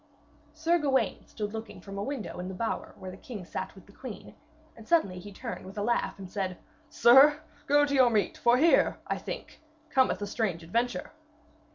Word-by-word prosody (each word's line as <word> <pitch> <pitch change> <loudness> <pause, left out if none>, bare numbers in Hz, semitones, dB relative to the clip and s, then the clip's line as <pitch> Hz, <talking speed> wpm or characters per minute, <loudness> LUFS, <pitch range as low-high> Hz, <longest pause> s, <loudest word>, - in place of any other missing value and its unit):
Sir 330 +2 +2
Gawaine 265 -7 0
stood 210 0 -5
looking 225 0 -7
from 195 0 -8
a - - -2
window 265 -7 -5
in 180 - -4
the 190 - -6
bower 225 +4 -3
where 185 - -7
the 185 - -10
king 205 -4 -8
sat 190 +2 -5
with 190 - -15
the 200 - -18
queen, 235 0 -9 0.4
and 225 - -14
suddenly 200 - +2
he 205 +3 -10
turned 230 +4 -6
with 190 +2 -11
a 205 - -1
laugh, 235 +2 0
and 195 -1 -8
said: 185 -2 -3 0.3
'Sir, 290 +2 +7 0.3
go 290 +1 +5
to 285 - -3
your 260 -3 +6
meat, 210 -5 +1
for 240 +1 +4
here, 325 +5 +4
I - - -2
think, - - -7 0.3
cometh 260 -8 +3
a 205 - -3
strange 200 -5 -2
adventure.' 235 +9 -1
225 Hz, 200 wpm, -29 LUFS, 195-265 Hz, 0.4 s, Sir